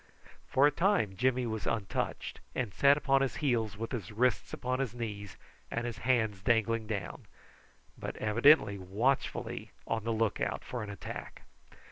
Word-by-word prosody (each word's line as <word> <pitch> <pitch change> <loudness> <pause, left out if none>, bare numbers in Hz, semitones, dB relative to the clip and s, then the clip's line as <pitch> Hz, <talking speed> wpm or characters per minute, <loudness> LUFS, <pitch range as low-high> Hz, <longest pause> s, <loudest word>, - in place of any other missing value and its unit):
For 135 - +5
a 145 - +5
time 155 - +2
Jimmy 125 +2 +1
was 110 -2 -3
untouched, 110 -4 -2 0.2
and 115 -7 -2
sat 140 0 +5
upon 135 -2 +3
his 135 - 0
heels 115 -8 0
with 115 +1 -4
his 110 -8 -4
wrists 125 +4 +1
upon 130 +1 -2
his 125 -4 -2
knees 100 -5 -5 0.3
and 115 +1 -2
his 120 -2 -4
hands 110 -6 +1
dangling 115 0 +1
down, 100 -5 -5 0.7
but - - -5
evidently 110 -1 +4
watchfully 105 +9 -1 0.2
on 110 - -1
the 115 - -1
look 110 -1 0
out - - -1
for 125 - -5
an 105 - -5
attack. 100 - -7
115 Hz, 160 wpm, -31 LUFS, 105-130 Hz, 0.7 s, For